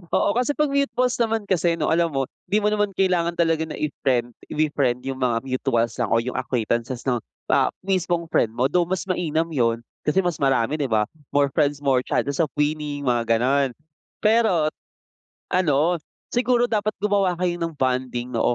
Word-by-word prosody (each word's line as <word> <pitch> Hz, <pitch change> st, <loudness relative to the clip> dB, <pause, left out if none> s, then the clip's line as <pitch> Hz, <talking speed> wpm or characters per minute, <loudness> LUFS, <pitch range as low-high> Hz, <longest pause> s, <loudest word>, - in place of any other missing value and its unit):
Oo, -, -, +3 dB
kasi 250 Hz, +3 st, +2 dB
'pag 300 Hz, 0 st, +1 dB
mutuals 275 Hz, -3 st, +1 dB
naman 225 Hz, -3 st, 0 dB
kasi 175 Hz, -2 st, +2 dB
'no 150 Hz, -, 0 dB
alam 165 Hz, +1 st, +2 dB
mo, 135 Hz, -1 st, 0 dB, 0.2 s
di 210 Hz, -, +1 dB
mo 210 Hz, -, +2 dB
naman 210 Hz, -1 st, 0 dB
kailangan 180 Hz, -3 st, +1 dB
talaga 165 Hz, -2 st, +2 dB
na 155 Hz, -, -7 dB
i-friend 125 Hz, -5 st, -1 dB, 0.2 s
ifi-friend 140 Hz, -5 st, 0 dB
yung 135 Hz, -1 st, -3 dB
mga 120 Hz, -2 st, +1 dB
mutuals 130 Hz, -3 st, 0 dB
lang -, -, -1 dB
o 115 Hz, -, +4 dB
yung 125 Hz, +2 st, -4 dB
acquaintances 120 Hz, -1 st, -1 dB
'no, 125 Hz, -2 st, +2 dB, 0.3 s
ah, -, -, +3 dB
mismong 175 Hz, -3 st, 0 dB
friend 115 Hz, -, +2 dB
mo 125 Hz, +3 st, +1 dB
though 175 Hz, +3 st, +2 dB
mas 190 Hz, +1 st, -2 dB
mainam 165 Hz, -3 st, 0 dB
yun, 115 Hz, -7 st, +1 dB, 0.3 s
kasi 150 Hz, +5 st, +2 dB
mas 175 Hz, -4 st, -1 dB
marami 135 Hz, -1 st, +1 dB
'di 145 Hz, -, -1 dB
ba? 105 Hz, -1 st, +2 dB, 0.3 s
More 145 Hz, -1 st, +3 dB
friends, 145 Hz, -3 st, +2 dB
more 135 Hz, -3 st, +2 dB
chances 140 Hz, -1 st, -1 dB
of 155 Hz, -5 st, +1 dB
winning 150 Hz, -1 st, -2 dB
mga 115 Hz, -2 st, +2 dB
gano'n 135 Hz, +2 st, +2 dB, 0.5 s
pero, 210 Hz, -8 st, +3 dB, 0.8 s
ano 170 Hz, -1 st, +2 dB, 0.3 s
siguro 245 Hz, 0 st, +2 dB
dapat 215 Hz, -1 st, 0 dB
gumawa 200 Hz, -3 st, +2 dB
kayo 175 Hz, -1 st, -1 dB
ng 165 Hz, -1 st, -3 dB
bonding 125 Hz, -2 st, -1 dB
'no, 120 Hz, -, +2 dB
150 Hz, 180 wpm, -23 LUFS, 130-185 Hz, 0.8 s, o